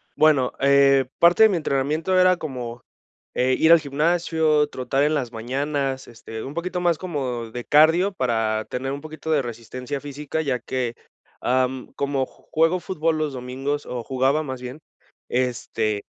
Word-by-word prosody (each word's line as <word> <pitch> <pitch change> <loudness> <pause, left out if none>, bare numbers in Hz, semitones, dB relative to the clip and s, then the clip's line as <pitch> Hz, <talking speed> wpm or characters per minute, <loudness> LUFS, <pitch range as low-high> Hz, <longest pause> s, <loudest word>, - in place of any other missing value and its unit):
Bueno, 150 -5 +4
eh, 140 -1 +5
parte 175 +6 +6
de 220 - +8
mi 190 - 0
entrenamiento 155 +5 0
era 185 0 +5
como, 125 -7 -6 0.5
eh, 130 +1 +2
ir 160 +1 +6
al 170 - +8
gimnasio, 155 0 +1
trotar 135 +1 -1
en 150 +1 +2
las 125 -5 -2
mañanas, 135 +3 -2
este, 110 -1 -9
un 140 - -7
poquito 180 +1 -3
más 170 -3 +2
como 130 -10 -4
de 120 +1 -6
cardio 165 +6 +4
para 110 -6 0
tener 135 +2 -3
un 140 - -5
poquito 155 +1 -7
de 145 -3 +3
resistencia 125 +4 -6
física, 145 +2 -4
ya 130 -5 -1
que, 125 -1 -3 0.5
am, 130 +1 0
como 140 -2 -1
juego 165 +3 0
fútbol 165 -3 -1
los 155 -2 -1
domingos 135 +3 -4
o 120 -2 -5
jugaba 135 +4 +1
más 130 -2 -6
bien, 125 +5 -7 0.5
este, 115 -4 -1
140 Hz, 160 wpm, -23 LUFS, 125-155 Hz, 0.5 s, de